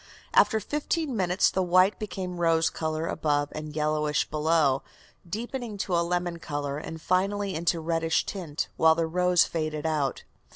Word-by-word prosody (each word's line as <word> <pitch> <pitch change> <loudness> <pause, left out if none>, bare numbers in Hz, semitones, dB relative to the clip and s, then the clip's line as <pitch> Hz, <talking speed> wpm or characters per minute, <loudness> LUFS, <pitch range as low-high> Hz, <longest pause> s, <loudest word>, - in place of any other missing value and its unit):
After 220 - +5
fifteen 295 - -2
minutes 185 -2 +2
the 190 - 0
white 185 +2 +3
became 185 -4 -5
rose 165 -1 +3
color 155 0 -2
above 145 -3 0
and 155 0 -7
yellowish 150 -1 0
below, 155 -3 +2 0.5
deepening 235 +2 -4
to 190 -1 -3
lemon 175 0 0
color, 145 -2 -3
and 160 +1 -7
finally 195 +3 0
into 170 +1 0
reddish 165 0 0
tint, 165 -6 -4
while 160 0 +5
the 165 0 0
rose 180 +1 +3
faded 155 -2 -3
out. 150 -4 -1
165 Hz, 150 wpm, -27 LUFS, 155-185 Hz, 0.5 s, After